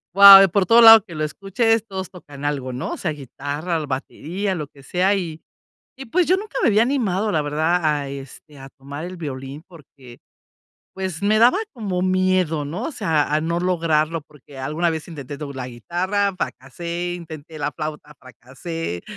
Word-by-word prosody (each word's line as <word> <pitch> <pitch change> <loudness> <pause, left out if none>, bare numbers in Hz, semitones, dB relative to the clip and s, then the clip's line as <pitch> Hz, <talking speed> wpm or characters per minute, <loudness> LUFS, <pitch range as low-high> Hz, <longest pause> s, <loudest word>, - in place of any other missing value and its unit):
wao, 195 -1 +10
por 195 +1 +1
todos 230 +5 +6
lados 225 -2 +10
que 170 - -11
lo 155 0 -3
escuches, 215 +7 0
todos 190 -3 -6
tocan 145 -6 -12
algo, 135 -3 -2
no 125 - -4
sea 155 - -2
guitarra, 145 +4 -4
batería, 175 +8 -4
lo 150 -3 -4
que 140 - -19
sea. 185 +8 +1
Y 165 -4 -5 0.6
y 270 - -8
pues 350 +9 +2
yo 370 - +4
nunca 405 -9 -6
me - - +5
había 210 +1 +4
animado, 220 -6 0
la 155 - +1
verdad, 160 +4 0
a 145 -2 0
este, 140 +2 -10
a 135 0 -11
tomar 140 +4 -9
el 180 0 -8
violín 140 -1 -7
porque, 140 -7 -16 0.8
pues 190 -2 -5
me 210 +2 +3
daba 240 - +5
como 200 -8 -3
miedo, 185 -4 +1
no 170 - -5
o 320 - -4
sea 160 - 0
a 155 - +2
no 170 +2 -1
lograrlo, 165 -3 0
porque 145 -2 -16
alguna 155 +6 -1
vez 160 +1 -5
intenté 145 -3 -8
tocar 140 -3 -7
la 125 - -5
guitarra, 185 - -1
fracasé, 170 +5 -5
intenté 160 -2 -10
la 145 0 -2
flauta, 150 -1 -7
fracasé. 130 - -7
165 Hz, 180 wpm, -21 LUFS, 145-190 Hz, 0.8 s, wao